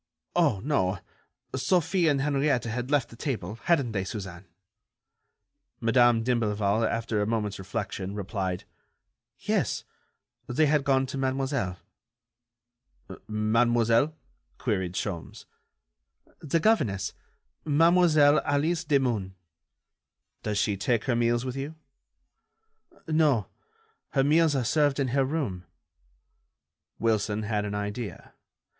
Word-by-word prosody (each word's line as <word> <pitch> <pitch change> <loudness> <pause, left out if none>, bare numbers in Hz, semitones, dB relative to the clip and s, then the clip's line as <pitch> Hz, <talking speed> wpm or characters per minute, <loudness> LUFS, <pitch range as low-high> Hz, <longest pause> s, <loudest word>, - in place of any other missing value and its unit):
Oh, 100 - +3
no... 105 -10 +1 0.6
Sophie 175 +4 +2
and 140 -3 +2
Henriette 140 -2 +1
had 120 +2 -3
left 140 -5 +1
the - - -12
table, 115 - -4
hadn't 140 -9 +2
they, 100 -3 -1
Suzanne?" 95 -2 -7 1.3
Madame 120 0 +4
d'Imblevalle, 110 -3 +1
after 115 -2 -1
a 105 - 0
moment's 105 -3 -2
reflection, 95 -1 -4
replied: 95 -3 -3 0.7
"Yes, - - -1 0.6
they 140 +6 +2
had 150 -1 +2
gone 135 -1 +3
to 135 +1 -5
Mademoiselle." 130 -8 -1 1.5
"Mademoiselle?" 115 +5 +2 0.4
queried 95 -7 -1
Sholmes. 90 -3 -5 0.9
"The 160 +2 0
governess, 120 - +1 0.5
Mademoiselle 155 -1 +5
Alice 160 +4 0
Demun." 125 - 0 1.1
"Does 105 -1 -2
she 100 -1 +1
take 115 +3 0
her 125 - 0
meals 120 +1 +1
with 130 0 -4
you?" 140 +4 -5 1.3
"No. 155 -9 +2 0.6
Her 135 - +3
meals 155 +1 +4
are 130 - +1
served 145 +1 +2
in 135 -2 +1
her 135 +2 +2
room." 130 - -3 1.3
Wilson 110 -1 0
had 105 -1 -1
an 105 0 -3
idea. 105 -2 -5
120 Hz, 110 wpm, -27 LUFS, 105-145 Hz, 1.5 s, Mademoiselle